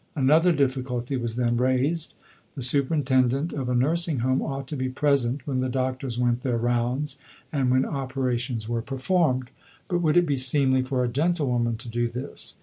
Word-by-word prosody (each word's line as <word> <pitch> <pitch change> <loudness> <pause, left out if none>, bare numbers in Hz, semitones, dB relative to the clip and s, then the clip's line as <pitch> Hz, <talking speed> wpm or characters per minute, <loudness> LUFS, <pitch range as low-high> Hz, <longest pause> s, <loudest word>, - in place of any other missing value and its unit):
Another 155 +5 +4
difficulty 130 -3 -1
was 120 -3 -3
then 120 -1 +1
raised. 130 +6 0 0.4
The 135 - -4
superintendent 135 +1 +1
of 130 -3 -3
a 125 - +1
nursing 155 +2 +1
home 130 0 +2
ought 135 -1 -4
to 150 - -3
be 130 -1 -2
present 135 -1 +1
when 135 -3 -1
the 130 0 0
doctors 130 -1 -2
went 120 0 +1
their 125 -3 0
rounds 120 +4 -1 0.3
and 135 -3 +1
when 130 +1 +3
operations 130 -4 -2
were 115 0 -1
performed. 130 0 0 0.4
But 175 -1 0
would 155 -1 +3
it 175 - +5
be 145 -4 0
seemly 130 0 +3
for 130 -1 -1
a - - +1
gentlewoman 125 -5 0
to 120 +2 -9
do 120 +1 -1
this? 125 +4 -7
130 Hz, 175 wpm, -25 LUFS, 125-140 Hz, 0.4 s, it